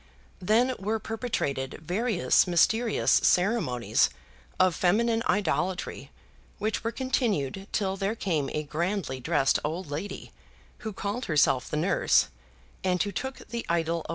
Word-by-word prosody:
Then 230 +7 +3
were 210 +3 -1
perpetrated 215 - -3
various 200 +1 +2
mysterious 220 +6 +2
ceremonies 180 - +3 0.5
of 185 -1 +4
feminine 225 +7 +2
idolatry 190 -1 -1 0.5
which 215 +1 -2
were 230 - -1
continued 210 - -1
till 195 -2 0
there 200 +3 -1
came 160 -10 -1
a 150 - -2
grandly 165 -1 -2
dressed 135 +2 +2
old 160 +1 -4
lady, 160 +8 -5 0.5
who 220 -3 -5
called 205 +5 -3
herself 145 -5 +2
the 150 - -2
nurse, 155 - +3 0.5
and 180 -1 +2
who 205 - -3
took 265 +7 -5
the 235 0 -3
idol 165 -1 0
away. - - -11
190 Hz, 130 wpm, -27 LUFS, 160-220 Hz, 0.5 s, of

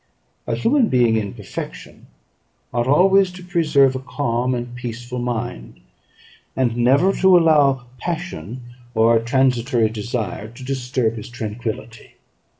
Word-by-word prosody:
A - - 0
human 245 +1 +2
being 120 -3 +3
in 110 +1 -2
perfection 105 -5 -8 0.7
ought 120 +1 0
always 190 +6 +4
to 180 0 -11
preserve 155 -7 +3
a - - -2
calm 125 -2 -1
and 120 0 -5
peaceful 120 0 -6
mind, 120 - -4 0.8
and 125 -3 +1
never 135 +11 +3
to 190 -2 +5
allow 145 -6 +3
passion 160 - -5 0.3
or 115 +1 +4
a 115 - +3
transitory 125 -2 +2
desire 110 -1 -4
to 120 +3 -12
disturb 125 -3 -1
his 110 +3 -8
tranquillity. 115 0 -6
125 Hz, 130 wpm, -21 LUFS, 115-145 Hz, 0.8 s, to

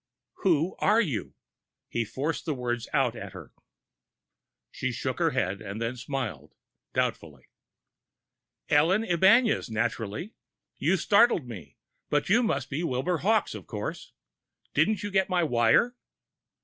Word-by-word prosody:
"Who 170 -1 +2
are 215 +3 +4
you?" 150 - -2 0.5
He 115 -1 -2
forced 145 +9 -3
the 155 - -1
words 120 -2 -3
out 130 -5 +1
at 100 -4 -8
her. 95 - -11 1.2
She - - -3
shook - - -3
her - - +3
head, 95 +3 -1
and 105 0 -6
then 115 +2 -2
smiled 120 - -5 0.4
doubtfully. - - -2 1.2
"Ellen 165 +9 +3
Ibañez, 205 - +4
naturally. 110 - -3 0.5
You 175 +6 +2
startled 205 - +4
me! 90 - -10 0.3
But 145 +3 0
you 225 +5 +5
must 140 - -1
be 145 +4 -2
Wilbur 165 +4 -1
Hawkes, 220 +4 +2
of - - -9
course. - - -6 0.6
Didn't 215 -1 +2
you 205 - -3
get 190 -1 +2
my 180 -1 +2
wire?" 120 - +3
145 Hz, 135 wpm, -27 LUFS, 115-190 Hz, 1.2 s, you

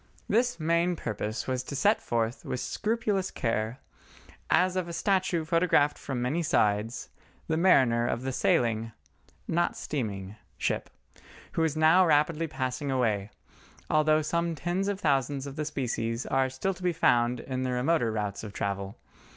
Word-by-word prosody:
This 245 +1 +1
main 170 +2 +2
purpose 110 -5 -4
was 130 -1 -1
to 135 +2 -7
set 205 +10 +3
forth 115 0 -1
with 125 - -3
scrupulous 210 - -1
care, 115 0 -2 0.7
as 185 0 +3
of 185 -2 -1
a - - -5
statue 185 -2 +1
photographed 165 -3 +3
from 125 -3 -4
many 145 +8 0
sides, 105 -7 0 0.4
the 160 - 0
mariner 130 -9 +4
of 120 - -2
the 135 - -2
sailing—not 110 - -1
steaming—ship, 105 -7 -4 0.6
who 165 - 0
is 155 -1 0
now 160 +4 +6
rapidly 160 0 +2
passing 130 -1 -3
away, 110 -6 0 0.6
although 155 0 +3
some 170 +2 -1
tens 175 +5 -1
of 200 -1 -1
thousands 140 - 0
of 140 -1 -7
the 150 0 -3
species 120 -5 -2
are 135 0 +1
still 130 +9 -2
to 180 - -15
be 180 -1 +1
found 120 -5 +2
in 130 +1 -4
the 130 0 -1
remoter 125 -1 +1
routes 105 -2 -3
of 105 -2 -7
travel. 100 +2 -3
135 Hz, 150 wpm, -28 LUFS, 115-170 Hz, 0.7 s, now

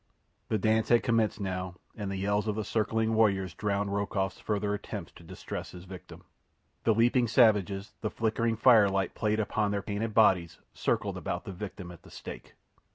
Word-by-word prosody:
The 110 - +2
dance 110 +2 +1
had 120 -1 +5
commenced 115 -3 +1
now, 95 -2 -3 0.2
and 105 -2 -4
the 95 - -3
yells 100 +2 0
of 105 - 0
the 110 - -2
circling 110 +1 0
warriors 100 -5 +2
drowned 100 +1 -1
Rokoff's 100 -2 -1
further 105 -1 -1
attempts 105 -3 -6
to - - -16
distress 90 +3 -7
his 90 -1 -10
victim. 95 -1 -11 0.6
The 110 - +4
leaping 120 +2 +3
savages, 105 -4 +3
the 105 - -1
flickering 115 +1 0
firelight 100 -6 +4
playing 105 -1 0
upon 105 0 0
their 100 0 -2
painted 105 +2 -3
bodies, 95 -6 +4 0.2
circled - - -1
about - - -4
the - - -5
victim 95 -2 -7
at 85 - -13
the - - -16
stake. - - -10
105 Hz, 175 wpm, -29 LUFS, 95-110 Hz, 0.6 s, had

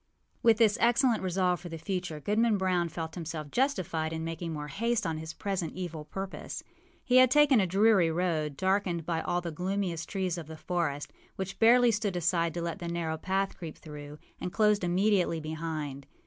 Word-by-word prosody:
â - - -46
With 230 -2 +5
this 220 -3 +4
excellent 235 0 +3
resolve 180 -1 +1
for 175 - -8
the 165 - -6
future, 175 -3 -3
Goodman 215 +6 +2
Brown 180 -3 +1
felt 160 0 -5
himself 160 -4 -6
justified 185 - 0
in 160 0 -3
making 165 +1 -4
more 150 -1 -5
haste 230 +7 -1
on 160 -1 -2
his 160 0 -6
present 185 -3 -3
evil 170 -4 -5
purpose. 195 +4 -6 0.4
He 250 0 +4
had 255 -1 +7
taken 295 -2 +5
a 190 - +2
dreary 195 -1 +4
road, 160 -4 -1
darkened 190 -3 0
by 165 -1 -1
all 175 0 -1
the 170 -1 -4
gloomiest 180 0 -2
trees 185 -4 -1
of 160 - -8
the 160 0 -8
forest, 160 -4 -2 0.2
which 190 0 -5
barely 240 +1 +6
stood 205 -3 -1
aside 170 -1 +1
to 170 - -2
let 170 -1 -3
the 170 - -5
narrow 170 -2 -2
path 195 +3 -1
creep 165 -4 -8
through, 150 -1 -9 0.2
and 180 - -4
closed 210 -1 +3
immediately 180 -1 +2
behind. 155 -3 -5
175 Hz, 190 wpm, -29 LUFS, 160-200 Hz, 0.4 s, had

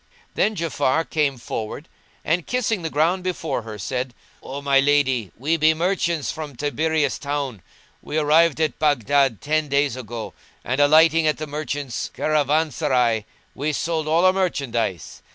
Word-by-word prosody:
Then 215 - +1
Ja'afar 160 -2 0
came 145 -4 0
forward 115 +5 -5 0.4
and 165 +2 0
kissing 230 -5 0
the 165 - -3
ground 165 +5 +1
before 165 -8 -2
her 110 -1 -8
said, 125 +5 -3 0.3
"O 135 +2 -6
my 140 -1 +3
lady, 135 -6 +2
we 155 +7 0
be 160 0 +4
merchants 170 -2 0
from 155 -4 -7
Tiberias 150 +1 0
town: 140 -7 -3 0.4
we 155 - -4
arrived 155 +1 +4
at 155 -1 0
Baghdad 140 -4 +2
ten 155 +1 0
days 140 -2 +1
ago; 120 -3 -7 0.3
and, 130 +3 0
alighting 160 +2 +5
at 155 - +1
the 155 - -4
merchants' 145 -3 -4
caravanserai, 140 -7 +1 0.3
we 145 +3 -2
sold 160 +1 -2
all 165 +3 +3
our 185 - +6
merchandise. 120 - -2
145 Hz, 150 wpm, -22 LUFS, 130-160 Hz, 0.4 s, our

